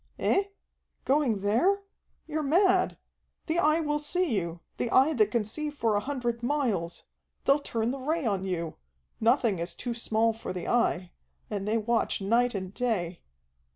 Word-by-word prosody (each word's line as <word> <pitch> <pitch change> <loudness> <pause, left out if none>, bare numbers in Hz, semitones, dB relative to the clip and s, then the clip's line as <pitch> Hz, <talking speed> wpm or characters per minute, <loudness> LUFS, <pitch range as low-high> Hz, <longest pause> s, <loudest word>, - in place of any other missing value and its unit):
"Eh? 390 - +2 0.6
Going 260 -7 +2
there? 305 - +2 0.4
You're 310 0 -2
mad. 365 +6 +3 0.5
The 330 +1 0
Eye 310 0 +3
will 295 -1 0
see 320 -2 0
you, 170 -3 -3 0.2
the 240 - -1
Eye 270 +7 +5
that 215 -6 +3
can 220 -1 0
see 300 +8 -2
for 230 -7 0
a - - +3
hundred 240 -1 -3
miles. 235 - -1 0.4
They'll 275 +2 +5
turn 230 -4 -1
the 275 - -5
Ray 310 +3 -1
on 200 -4 0
you. 170 -4 -3 0.4
Nothing 230 -4 +3
is 170 +1 -3
too 245 - -3
small 225 -1 +1
for 220 -4 -6
the 180 - -5
Eye. 185 -7 +1 0.4
And 200 -1 -3
they 220 +2 +2
watch 230 +1 0
night 235 +4 +2
and 190 -1 -4
day." 190 -9 -1
235 Hz, 165 wpm, -28 LUFS, 205-295 Hz, 0.6 s, Eye